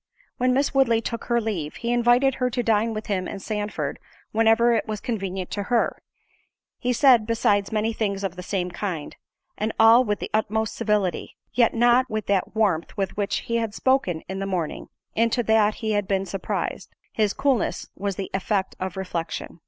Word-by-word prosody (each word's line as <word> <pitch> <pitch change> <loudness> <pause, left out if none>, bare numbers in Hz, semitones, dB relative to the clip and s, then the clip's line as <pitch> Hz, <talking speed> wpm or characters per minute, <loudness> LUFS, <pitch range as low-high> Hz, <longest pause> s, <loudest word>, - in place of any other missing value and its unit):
When 255 0 +2
Miss 275 +3 +1
Woodley 250 -4 +4
took 230 0 -5
her 235 -1 +2
leave, 195 -10 -3
he 235 0 -2
invited 240 +3 +4
her 250 - +2
to 245 0 -2
dine 225 0 +2
with 215 - -4
him 185 -3 -1
and - - -6
Sandford 210 +1 -3 0.3
whenever 225 +2 +4
it 225 - 0
was 215 -1 -3
convenient 195 -6 -4
to 205 - -2
her; 240 -2 +1 0.8
he 250 - 0
said, 240 -3 +5
besides, 205 -3 +1
many 220 +1 0
things 200 -3 -2
of 190 -2 -2
the 180 - -7
same 180 -1 -2
kind, 175 -5 -4 0.4
and 215 +1 0
all 225 +3 +7
with 210 -3 -1
the - - -6
utmost 220 0 0
civility, 210 -6 -1 0.2
yet 240 -2 +3
not 240 +2 +4
with 215 -1 -3
that 200 +1 0
warmth 195 -7 0
with 195 -2 -2
which 205 -1 -1
he 235 - -1
had 225 -2 -2
spoken 260 -12 +1
in 190 +1 -4
the 195 - -3
morning—into 220 +6 -2
that 215 -1 +3
he 220 -1 -3
had 205 -2 0
been 195 -1 0
surprised—his 200 +2 -3
coolness 260 -10 0
was 200 0 -3
the 195 - -5
effect 190 0 -1
of 185 0 -4
reflection. 175 -3 -4
215 Hz, 185 wpm, -24 LUFS, 195-235 Hz, 0.8 s, all